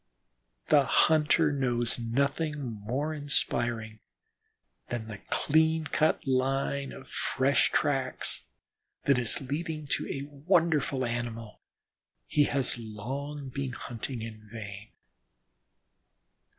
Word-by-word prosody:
The 145 Hz, -2 st, +7 dB
hunter 155 Hz, +2 st, +4 dB
knows 120 Hz, -4 st, 0 dB
nothing 140 Hz, +6 st, 0 dB
more 125 Hz, +5 st, -2 dB
inspiring 120 Hz, -6 st, 0 dB, 0.9 s
than 120 Hz, -2 st, -3 dB
the 105 Hz, -3 st, -7 dB
clean 160 Hz, +1 st, +3 dB
cut 155 Hz, +1 st, +1 dB
line 135 Hz, +1 st, +1 dB
of 135 Hz, -, -10 dB
fresh 130 Hz, +2 st, +2 dB
tracks 135 Hz, -3 st, 0 dB, 0.6 s
that 140 Hz, -3 st, +4 dB
is 120 Hz, +3 st, 0 dB
leading 155 Hz, +3 st, -3 dB
to -, -, 0 dB
a 135 Hz, -, -3 dB
wonderful 150 Hz, -3 st, +2 dB
animal, 115 Hz, -2 st, -4 dB, 0.6 s
he 145 Hz, -1 st, +3 dB
has 135 Hz, -4 st, -1 dB
long 135 Hz, +6 st, -5 dB
been 135 Hz, -1 st, -3 dB
hunting 120 Hz, 0 st, -5 dB
in 110 Hz, -1 st, -9 dB
vain. 105 Hz, -2 st, -7 dB
135 Hz, 100 wpm, -29 LUFS, 115-145 Hz, 0.9 s, The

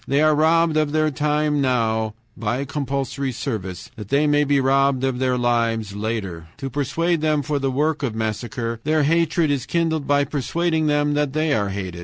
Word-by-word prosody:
They 140 Hz, +3 st, +2 dB
are 155 Hz, 0 st, +5 dB
robbed 160 Hz, +1 st, +3 dB
of 155 Hz, -1 st, +1 dB
their 155 Hz, 0 st, +2 dB
time 150 Hz, +1 st, 0 dB
now 110 Hz, -4 st, 0 dB, 0.2 s
(by 120 Hz, +5 st, -2 dB
compulsory 140 Hz, -1 st, -3 dB
service) 100 Hz, -8 st, -5 dB
that 105 Hz, -2 st, -8 dB
they 140 Hz, +2 st, +3 dB
may 145 Hz, 0 st, +3 dB
be 145 Hz, -1 st, +2 dB
robbed 135 Hz, 0 st, +2 dB
of 130 Hz, -2 st, 0 dB
their 130 Hz, -1 st, +1 dB
lives 115 Hz, -4 st, 0 dB
later. 100 Hz, -6 st, -4 dB
To 135 Hz, -2 st, -5 dB
prepare 165 Hz, +6 st, 0 dB
them 155 Hz, -2 st, +1 dB
for 145 Hz, 0 st, -1 dB
the 135 Hz, 0 st, 0 dB
work 150 Hz, +4 st, 0 dB
of 125 Hz, -6 st, -2 dB
massacre, 115 Hz, +1 st, -3 dB
their 155 Hz, 0 st, +2 dB
hatred 165 Hz, 0 st, +2 dB
is 135 Hz, -2 st, -2 dB
kindled 160 Hz, -4 st, 0 dB
by 145 Hz, 0 st, +3 dB
persuading 160 Hz, +4 st, -1 dB
them 145 Hz, 0 st, +2 dB
that 145 Hz, -2 st, 0 dB
they 155 Hz, 0 st, +1 dB
are 100 Hz, -6 st, 0 dB
hated. 95 Hz, -3 st, -5 dB
140 Hz, 190 wpm, -22 LUFS, 115-150 Hz, 0.2 s, are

